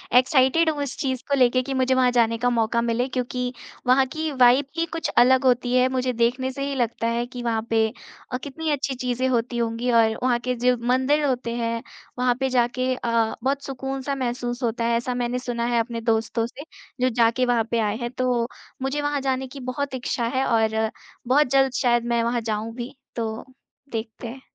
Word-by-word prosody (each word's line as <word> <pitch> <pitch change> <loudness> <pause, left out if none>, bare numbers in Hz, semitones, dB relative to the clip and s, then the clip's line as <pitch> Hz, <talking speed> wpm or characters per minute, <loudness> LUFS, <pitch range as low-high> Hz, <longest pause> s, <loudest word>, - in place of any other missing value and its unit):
Excited 265 +5 +4
हूँ 290 -2 -1
इस 270 - -5
चीज़ 260 -2 -2
को 280 - +3
लेके 255 0 +4
कि 270 - -4
मुझे 260 0 +2
वहाँ 250 -1 +4
जाने 230 -2 +2
का 245 +1 +1
मौका 235 0 +1
मिले 235 +2 0
क्योंकि 250 0 -3 0.3
वहाँ 265 +1 +5
की 315 -1 -2
वाइब 255 +1 +5
ही 335 - +2
कुछ 330 - -2
अलग 260 +2 +6
होती 245 0 +2
है 255 0 +5
मुझे 255 -1 -1
देखने 245 +3 +1
से 275 +1 -4
ही 280 - -3
लगता 235 -2 -1
है 235 +1 0
कि 245 -1 -8
वहाँ 225 -2 0
पे 225 -1 +3 0.4
अ, 250 - -1
कितनी 310 +3 -4
अच्छी 275 -2 -1
चीज़ें 250 +1 -1
होती 240 0 0
होंगी 235 +1 -1
और 225 -1 +4
वहाँ 245 -2 +2
के 250 +1 -2
जो 250 +1 +2
मंदिर 260 +4 +2
होते 245 -3 -1
हैं, 230 -1 -2 0.4
वहाँ 250 -1 +3
पे 265 0 +1
जाके 255 +1 +1
अ, 230 -2 0
बहुत 275 +1 0
सुकून 270 0 -4
सा 275 +1 -2
महसूस 245 -1 -3
होता 230 0 -1
है 235 0 +2
ऐसा 245 +1 -2
मैंने 245 0 -1
सुना 240 -2 -3
है 240 -1 +2
अपने 230 0 -2
दोस्तों 225 0 0
से, 280 +4 -10 0.4
जो 255 - +4
जाके 235 +1 +2
वहाँ 240 -2 +2
पे 230 - +2
आए 210 -1 0
हैं 240 0 -4
तो 250 -2 0 0.3
मुझे 270 +2 -1
वहाँ 290 -1 -1
जाने 265 -1 -1
की 275 +2 -10
बहुत 280 +1 -3
इच्छा 240 -1 -2
है 265 - +2
और 220 -1 +1 0.4
बहुत 285 +2 +4
जल्द 270 -1 +3
शायद 240 -2 +2
मैं 235 -1 +1
वहाँ 235 0 0
जाऊँगी, 225 +4 -4 0.2
तो 225 -1 -3 0.5
देखते 225 +1 -5
हैं। 260 +3 -8
245 Hz, 210 wpm, -24 LUFS, 235-260 Hz, 0.5 s, अलग